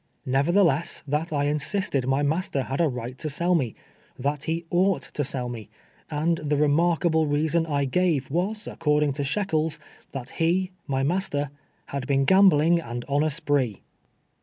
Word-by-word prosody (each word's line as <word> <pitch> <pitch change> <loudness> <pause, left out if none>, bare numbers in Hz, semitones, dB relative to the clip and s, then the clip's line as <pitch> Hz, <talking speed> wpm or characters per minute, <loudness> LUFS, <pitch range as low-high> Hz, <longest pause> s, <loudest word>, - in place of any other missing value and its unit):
— - - -44
nevertheless, 165 +4 +2
that 150 +4 -1
I 145 -2 0
insisted 150 -1 -1
my 135 +2 +2
master 145 -2 0
had 135 +5 -2
a 165 - +4
right 125 -2 -5
to 155 - -2
sell 170 +5 +1
me; 130 -10 0 0.4
that 145 +3 -2
he 165 +1 -2
oucjld 185 +2 +1
to 145 - -2
sell 130 -2 -3
me; 115 -4 -7 0.4
and 165 +3 0
the 150 -1 0
remarkable 160 +2 +2
reason 160 +3 +1
I 140 -2 0
gave 150 -2 0
was, 200 +7 -1
according 150 -1 +1
to 140 +1 -3
Shekels, 160 -1 0 0.3
because 135 -2 -6
he, 180 +3 +1 0.2
my 135 -2 0
master, 145 -3 -1 0.4
"had 140 -2 -4
been 135 -1 +2
gambling 175 -2 +5
and 120 -5 -6
on 145 +1 +2
a 155 - +2
spree 140 -7 0
150 Hz, 165 wpm, -25 LUFS, 140-170 Hz, 0.4 s, gambling